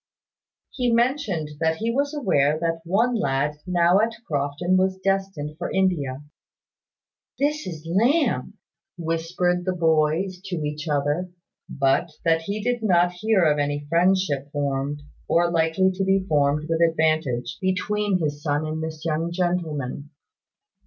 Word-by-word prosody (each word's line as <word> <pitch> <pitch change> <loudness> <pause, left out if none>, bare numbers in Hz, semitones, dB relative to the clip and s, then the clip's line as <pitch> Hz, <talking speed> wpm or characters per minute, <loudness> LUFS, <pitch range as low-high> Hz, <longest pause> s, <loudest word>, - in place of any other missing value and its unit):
He 245 -2 0
mentioned 230 - +1
that 160 0 +1
he 225 +7 -1
was 280 +3 0
aware 155 - +2
that 165 0 -1
one 220 +8 +2
lad 145 - 0
now 175 +1 +4
at 225 +1 +1
Crofton 145 +5 0
was 190 0 +2
destined 190 -6 -2
for 175 - -3
India 150 -8 0 1.1
"That 290 +2 +2
is 160 -3 -7
Lamb," 240 - +1 0.4
whispered 175 +2 -1
the 185 0 -1
boys 165 +3 +1
to 190 -2 -3
each 150 +2 -4
other. 145 +4 0 0.4
But 140 +4 +1
that 165 -1 +3
he 200 +5 -4
did 245 0 0
not 175 -4 +3
hear 190 +2 +1
of 150 -1 +3
any 145 0 -1
friendship 170 -5 +1
formed, 145 0 -2 0.2
or 170 0 +2
likely 170 +3 +2
to 190 +1 -2
be 190 0 +2
formed 150 -1 +1
with 165 0 0
advantage 155 -6 +1
between 195 +1 0
his 145 -4 -2
son 145 0 0
and 155 +1 -3
this 160 0 -6
young 165 +1 -1
gentleman. 160 -6 -2
170 Hz, 140 wpm, -24 LUFS, 150-190 Hz, 1.1 s, now